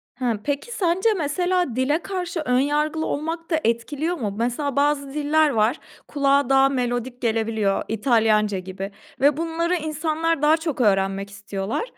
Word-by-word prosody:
Hıı. 240 -5 -1
Peki, 285 +10 -3
sence 380 +1 +1
mesela 355 -2 0
dile 280 +6 +1
karşı 360 -3 -3
ön 250 -1 +2
yargılı 300 +3 0
olmak 330 +3 -3
da 320 -3 +2
etkiliyor 285 +9 -1
mu? 215 - -3
Mesela 245 +4 -1
bazı 280 -1 +1
diller 305 +1 +2
var, 225 -2 +1 0.3
kulağa 280 -2 +2
daha 270 0 +5
melodik 245 -1 -2
gelebiliyor. 220 -3 0
İtalyanca 220 -3 +2
gibi 190 +2 -6 0.3
ve 285 +1 +4
bunları 335 +2 0
insanlar 315 0 -1
daha 305 +2 +5
çok 315 -5 -3
öğrenmek 195 -2 +1
istiyorlar. 200 - -4
280 Hz, 145 wpm, -23 LUFS, 225-315 Hz, 0.3 s, daha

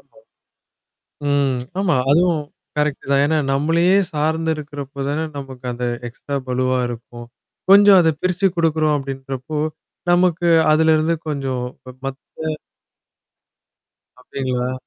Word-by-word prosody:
ஆமா. - - -26 1.1
ம். 140 -2 +2 0.2
ஆமா. 180 -7 +2
அதுவும் 170 +1 +3 0.4
கரெக்ட் 150 -2 -1
தான். 140 - +4
ஏன்னா 160 +1 +2
நம்மளையே 165 +7 +3 0.2
சார்ந்து 160 +2 0
இருக்கிறப்ப 140 -2 -6
தானே 150 +3 -1
நமக்கு 135 -2 -8
அந்த 125 +1 -4 0.2
எக்ஸ்ட்ரா 140 +4 -6
பளுவா 130 0 +1
இருக்கும். 120 0 -9 0.4
கொஞ்சம் 200 -1 +8
அத 165 - +3
பிரிச்சி 185 +2 +1
குடுக்குறோம் 155 -2 +2
அப்பிடின்றப்போ, 135 +1 -5 0.5
நமக்கு 175 -1 +3 0.2
அதுலருந்து 160 +1 +3
கொஞ்சம் 135 -4 -2 0.2
ம 130 - -9
மத்த 155 +3 -5 1.6
அப்பிடிங்களா? 125 -1 -3
145 Hz, 110 wpm, -20 LUFS, 135-160 Hz, 1.6 s, கொஞ்சம்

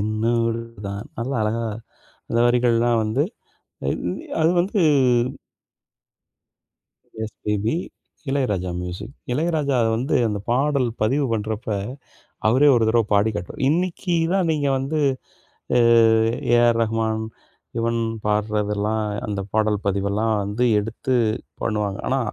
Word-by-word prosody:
என்னோடுதான் 115 -1 -2
நல்லா, 125 +3 -2
அழகா 115 +2 -1 0.7
அது 115 - +2
வரிகள் 120 -1 +3
எல்லாம் 115 -1 +2
வந்து. 115 +7 +1 0.7
இந்தி 325 - -4 0.2
அது 160 - +4
வந்து 200 +4 -1 2.4
எஸ்.பி.பி, 105 +2 -2 0.5
இளையராஜா 105 -10 0
மியூசிக். 90 +7 -6 0.2
இளையராஜா 150 -1 0 0.2
வந்து, 130 +6 -1
அந்த 105 -1 -2
பாடல் 135 -1 +2
பதிவு 135 +6 +2
பண்றப்ப, 110 +2 -3 0.8
அவரே 130 +6 +5
ஒரு 115 - +3
தடவ 115 0 +3
பாடி 100 +2 +4
காட்டுவார். 105 +10 -6
இன்னிக்கிதான், 175 +1 0
நீங்க 145 -2 0
வந்து 145 +4 -2 0.8
அ, - - +5 0.8
ஏ.ஆர்.ரஹ்மான், 115 -2 +2 0.5
யுவன் 115 0 0 0.2
பாடுறதெல்லாம், 105 0 0 0.2
அந்தப் 100 -1 -4
பாடல் 110 -1 +2
பதிவெல்லாம் 100 +3 0
வந்து, 105 +5 -1 0.2
எடுத்து 115 +5 -3 0.5
பண்ணுவாங்க. 105 -2 -1
ஆனா 135 - +1
115 Hz, 100 wpm, -22 LUFS, 105-135 Hz, 2.4 s, அவரே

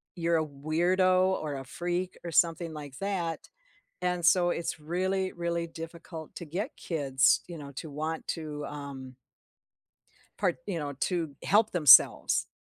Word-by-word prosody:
you're 170 -1 +1
a 160 - 0
weirdo, 175 +6 +2 0.2
or 150 -2 -4
a 135 - -7
freak, 175 +5 -3
or 170 - -5
something 165 0 +2
like 145 -3 -8
that, 185 -5 -3 0.5
and 180 -1 -1
so, 175 +1 +5
it's 170 -2 -3
really, 185 +4 -1
really 170 -1 -2
difficult 165 0 -9
to - - -6
get 185 - -4
kids, 135 -5 +2
you 175 - -8
know, 140 -2 -8
to 160 - -6
want 155 +2 -4
to, 150 -2 -4
um 140 -3 -8 1.2
part 185 -4 0
you 190 -4 -2
know, 145 -2 -4
to 165 -5 -1
help 215 +2 +4
themselves. 155 -7 +6
165 Hz, 145 wpm, -29 LUFS, 150-180 Hz, 1.2 s, themselves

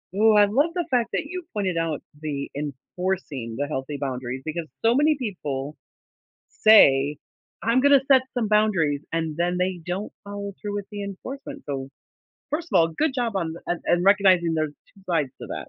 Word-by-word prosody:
Ooh, 220 +1 +5
I 205 - +7
love 285 +11 +1
the 350 -2 0
fact 240 -2 +2
that - - -1
you 360 +3 -7
pointed 190 -5 -1
out 165 -3 -1 0.2
the 145 -3 -4
enforcing 145 -3 -4
the 145 +1 -1
healthy 145 0 -4
boundaries 130 -1 -4
because 160 +1 -4 0.2
so 225 +1 +5
many 295 +3 +3
people 150 - -4 0.7
say, 145 -9 +5 0.4
"I'm 230 +4 +2
gonna 280 0 +5
set 270 -2 +6
some 235 -4 0
boundaries," 180 -9 +2
and 160 -2 -2
then 175 +1 0
they 180 0 0
don't 180 +5 -5
follow 200 0 -5
through 205 -1 -4
with 205 -1 -4
the 205 -1 -5
enforcement. 275 +8 -8
So, 135 -2 -4 0.6
first 325 +3 -2
of - - +3
all, 165 -1 +5
good 270 - -1
job 240 -5 -1
on 165 -4 -2
the 170 0 -4
and 175 0 +2
recognizing 190 -4 +5
there's 155 -2 -1 0.2
2 200 - -19
sides 150 -7 0
to - - -7
that. - - -6
185 Hz, 185 wpm, -24 LUFS, 150-220 Hz, 0.7 s, I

